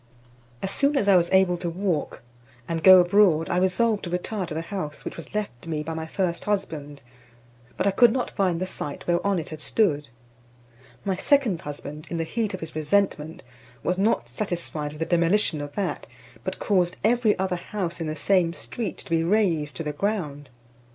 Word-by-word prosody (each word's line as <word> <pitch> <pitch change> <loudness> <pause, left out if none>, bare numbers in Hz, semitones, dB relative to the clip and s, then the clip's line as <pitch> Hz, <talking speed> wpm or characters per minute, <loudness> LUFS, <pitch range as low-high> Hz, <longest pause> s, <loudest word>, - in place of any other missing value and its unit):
As 195 - -1
soon 280 +5 +2
as 205 - +1
I 200 - +6
was 175 -1 +3
able 190 -2 +4
to 175 0 -3
walk, 170 - -2 0.4
and 165 -1 -2
go 185 -1 +10
abroad, 175 -3 +3
I 175 - +1
resolved 200 +4 +2
to - - -4
retire 180 +2 -3
to 160 - -5
the 160 - -1
house 165 -5 -6
which - - -5
was 165 +4 -10
left 170 -10 -4
me 155 -2 -2
by 160 +2 -4
my 160 0 -4
first 175 0 -2
husband, 155 -9 -3 0.7
but - - 0
I 200 - +4
could 235 +4 +6
not 250 +1 -2
find 185 -4 0
the 185 - -1
site 145 -5 -5
whereon 180 +3 +1
it 160 - -4
had 155 - -7
stood. 150 -7 +1 1.0
My 190 -2 0
second 260 - +2
husband, 145 +2 -7
in 170 - -3
the 165 - 0
heat 210 +3 -2
of 185 - -10
his 160 -1 -6
resentment, 155 -1 0 0.4
was 180 +1 0
not 195 - +2
satisfied 155 - -3
with 150 - -10
the - - +1
demolition 170 -1 +2
of 145 0 -7
that, 200 - -3 0.4
but - - -3
caused 185 -3 +1
every 225 -1 +3
other 185 -1 0
house 175 -2 -4
in 165 - -2
the 155 - -3
same 175 +1 +2
street 190 +5 -5
to - - -11
be 165 0 +3
razed 170 -6 +1
to 165 - -4
the 150 -1 -3
ground. 150 -7 -2
175 Hz, 200 wpm, -25 LUFS, 155-200 Hz, 1.0 s, go